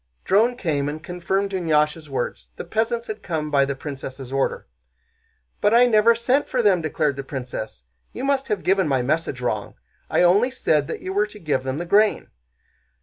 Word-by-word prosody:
Dron 230 +6 +3
came 145 - -1
and 155 +1 -7
confirmed 190 +3 -2
Dunyásha's 155 -4 0
words; 120 - -4
the - - -6
peasants 230 +1 -1
had 215 -2 -6
come 155 -5 -3
by 140 -1 +4
the 140 0 -3
princess' 135 -2 -7
order. 135 0 -1 1.0
"But 210 +2 +4
I 245 +1 +7
never 230 0 +5
sent 250 +5 +1
for 250 -2 0
them," 190 -5 +4
declared 150 -2 -1
the 140 - -4
princess. 125 - -6 0.3
"You 250 - -7
must 275 -1 0
have 210 -5 -2
given 190 -2 +2
my 135 -3 +1
message 145 -2 -1
wrong. 110 -4 -3 0.3
I - - +3
only 200 +8 +4
said 155 - +1
that - - -5
you 190 - -4
were 205 +2 +2
to 210 - -12
give 150 -6 -1
them 130 +1 -3
the 175 - -4
grain." 205 +4 +2
170 Hz, 190 wpm, -23 LUFS, 140-210 Hz, 1.0 s, I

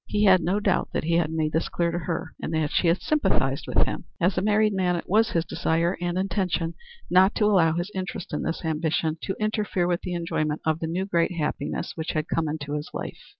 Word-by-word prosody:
He 210 0 0
had 185 -3 +6
no 180 +5 +1
doubt 200 -3 +1
that - - -1
he 165 +1 +2
had 165 -3 +1
made 155 -1 0
this 160 - 0
clear 170 -1 0
to 175 - -2
her 165 0 -4
and - - -3
that 155 -2 0
she 170 - +3
sympathized 305 +10 0
with - - +3
him. - - -5
As 180 +2 +2
a 180 - +1
married 215 +1 +3
man 180 -2 +1
it 170 - -5
was 220 +4 +3
his 165 -4 0
desire 165 +3 0
and 175 0 -1
intention 180 -3 -1 0.4
not 190 +3 +5
to 210 - +2
allow 180 -6 +4
his 175 +4 -3
interest 185 0 -5
in - - -1
this 165 +1 -3
ambition 160 0 0
to 190 - -3
interfere 215 -4 0
with 175 -1 0
the 180 - -4
enjoyment 155 -3 -1
of 160 0 +1
the 160 - -2
new 180 +4 -1
great 170 -3 +1
happiness 155 -3 -2
which 160 -1 -4
had 155 +1 -1
come 165 -1 0
into 145 -1 -4
his 150 0 -3
life. - - -5
175 Hz, 235 wpm, -25 LUFS, 160-190 Hz, 0.4 s, had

